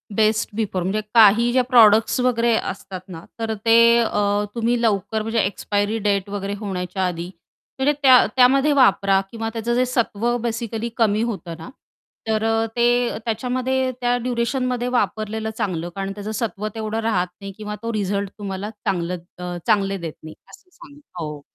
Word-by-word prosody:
Best 215 0 +2
before 195 -5 -2
म्हणजे 205 +4 -1
काही 230 +2 +6
ज्या 255 0 +3
प्रॉडक्ट्स 225 -2 +5
वगैरे 235 -2 +2 0.2
असतात 190 -1 -8
ना, 170 -3 -9 0.2
तर 225 -1 -2
ते 225 0 +5 0.2
अ, 205 -2 +1
तुम्ही 235 +1 0
लवकर 215 -1 0
म्हणजे 225 +1 -1
एक्सपायरी 205 +2 -1
डेट 200 -1 0
वगैरे 200 0 -4
होण्याच्या 190 -2 -3
आधी 175 0 -5 0.5
म्हणजे 290 +3 +3
त्या 260 -2 +7
त्यामध्ये 270 +3 +5
वापरा 195 -7 +4
किंवा 225 -1 -4
त्याचं 230 +1 -2
जे 255 +1 +3
सत्व 240 -1 0
बेसिकली 230 0 -3
कमी 215 -2 +2
होतं 175 -6 -6
ना, 165 - -10 0.6
तर 220 0 0
अ, 225 0 +1
ते 240 0 +2
त्याच्यामध्ये 255 +3 -1
त्या 245 0 +2
ड्युरेशनमध्ये 245 +1 -1
वापरलेलं 215 +2 -2
चांगलं. 175 -3 -2
कारण 195 0 -3
त्याचं 210 +1 -6
सत्व 215 -2 -3
तेवढं 220 0 -3
राहत 205 -5 0
नाही 200 0 -6
किंवा 210 -1 -5
तो 230 0 -3
रिझल्ट 200 -1 -1
तुम्हाला 200 0 -5
चांगलं 180 -4 -3 0.2
अ, 180 0 -5
चांगले 195 -1 +2
देत 165 -3 -6
नाही 155 0 -10
असं 370 - -17
सांग 285 +1 -15 0.2
हो. 150 -3 -5
220 Hz, 160 wpm, -21 LUFS, 195-235 Hz, 0.6 s, त्या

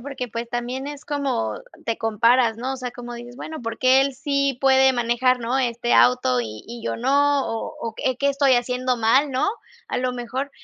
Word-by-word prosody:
porque 255 -1 -6
pues, 230 +1 -5
también 245 +3 -4
es 290 0 -8
como 270 - -2 0.2
te 230 - -2
comparas, 230 +1 +3
¿no? 255 +3 -3
O - - -4
sea, 250 -1 -5
como 240 0 -9
dices: 240 +1 -10
"Bueno, 315 +2 -7
¿por 230 -2 -5
qué 260 +1 +5
él 275 0 0
sí 275 -1 0
puede 265 0 +5
manejar, 245 +1 +1
no, 240 +3 -1
este 240 -1 -1
auto 245 - +4
y 110 -2 -7
y 235 0 -8
yo - - -2
no?", 280 +3 +2
o 225 0 -4
o 225 -1 -4
eh, 260 -1 0
"¿qué 280 +2 +1
estoy 275 -1 +3
haciendo 250 +1 0
mal?", 260 +6 +3
¿no? 260 +6 0 0.4
A - - -1
lo 250 0 -1
mejor, 250 +3 -4
250 Hz, 210 wpm, -23 LUFS, 235-270 Hz, 0.4 s, qué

